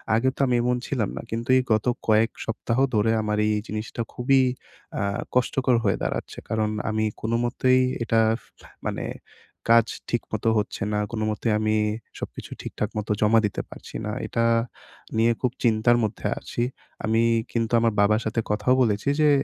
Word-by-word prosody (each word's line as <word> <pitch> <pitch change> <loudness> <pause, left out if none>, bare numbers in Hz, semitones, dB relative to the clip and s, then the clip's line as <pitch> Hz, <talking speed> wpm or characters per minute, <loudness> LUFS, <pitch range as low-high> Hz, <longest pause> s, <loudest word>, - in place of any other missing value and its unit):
আগে 130 +3 +3
তো - - -17
আমি 125 - +2
এমন 125 0 +1
ছিলাম 115 -8 -1
না। - - -3
কিন্তু 115 +3 -3
এই 130 - +2
গত 110 - +1 0.2
কয়েক 110 +1 +4
সপ্তাহ 115 +1 -2 0.2
ধরে 110 +2 +3
আমার 105 0 -1
এই 110 - +2
জিনিসটা 110 +2 -4
খুবই 135 +2 +3 0.6
আহ 100 +4 -1
কষ্টকর 125 0 +2
হয়ে 100 - +2
দাঁড়াচ্ছে। - - -3
কারণ, 110 -1 +1 0.2
আমি 110 0 0 0.2
কোনোমতেই 120 +3 +2 0.2
এটা 115 -1 +2 0.7
মানে - - -3 0.6
কাজ 115 -1 +7 0.2
ঠিকমতো 115 -2 -1
হচ্ছে 105 - -2
না। 105 - +1
কোনোমতেই 110 0 -1
আমি 110 0 +1 0.4
সবকিছু - - -7
ঠিকঠাক 105 - -3
মতো 105 0 -2
জমা 110 +2 +5
দিতে 100 - -2
পারছি - - -11
না। 105 - -2 0.2
এটা 115 0 0 0.7
নিয়ে 115 +1 +4
খুব 125 -2 +1
চিন্তার 120 0 +4
মধ্যে 105 0 -2
আছি। 120 - -4 0.4
আমি 110 +1 +2 0.3
কিন্তু 115 -1 -1
আমার 115 -2 +2
বাবার 105 +2 +3
সাথে 110 +1 0
কথাও 105 +4 +2
বলেছি 110 +3 +1
যে, 150 - +5
115 Hz, 160 wpm, -25 LUFS, 110-120 Hz, 0.7 s, কাজ